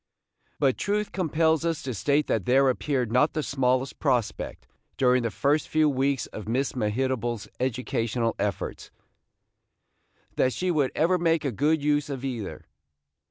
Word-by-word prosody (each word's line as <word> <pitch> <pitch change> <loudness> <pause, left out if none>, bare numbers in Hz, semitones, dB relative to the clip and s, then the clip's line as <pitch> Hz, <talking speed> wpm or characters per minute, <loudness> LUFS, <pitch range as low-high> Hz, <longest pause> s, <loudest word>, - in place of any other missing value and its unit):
But 135 -3 +2
truth 210 0 -1
compels 160 -3 +1
us 165 -2 -1
to 130 - -3
state 140 +7 +1
that 105 -5 -1
there 135 +2 +5
appeared 130 -3 -1
not 125 +6 +3
the 155 - -1
smallest 130 -1 0
prospect, 120 -7 -1 0.3
during 125 -1 +4
the 115 - -1
first 140 +7 +1
few 155 -1 +3
weeks 135 -2 +1
of 105 - -9
Miss 130 +4 0
Mehitable's 120 0 -1
educational 120 -2 -1
efforts, 105 -1 -3 1.5
that 130 - +2
she 185 0 -1
would 145 -5 +1
ever 180 +3 +2
make 165 -2 +1
a 140 - 0
good 145 +6 +1
use 145 0 +1
of 135 -1 -4
either. 120 -7 -5
135 Hz, 150 wpm, -26 LUFS, 125-150 Hz, 1.5 s, there